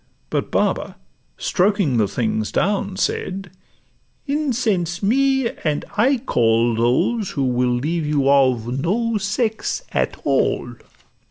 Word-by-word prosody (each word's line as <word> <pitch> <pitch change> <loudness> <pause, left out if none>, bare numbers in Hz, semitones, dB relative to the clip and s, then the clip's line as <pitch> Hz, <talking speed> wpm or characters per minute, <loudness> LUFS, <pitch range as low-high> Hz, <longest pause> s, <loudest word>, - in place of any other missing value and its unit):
But - - -1
Baba, - - -1 0.4
stroking 185 - +1
The 105 -3 +3
things 110 +1 -2
down, 200 -1 0
said, 190 0 -2 0.7
'Incense 230 - -1
me, 265 +3 +2
and 150 -2 -1
I 260 +6 +3
call 115 - +2
Those 125 - +1
who 140 - -2
will 125 -1 +1
leave 155 +5 -1
you 145 -2 +1
of 130 -3 +2
no 225 +6 0
sex 220 - -1
at - - -1
all. - - 0
180 Hz, 115 wpm, -21 LUFS, -, 0.7 s, The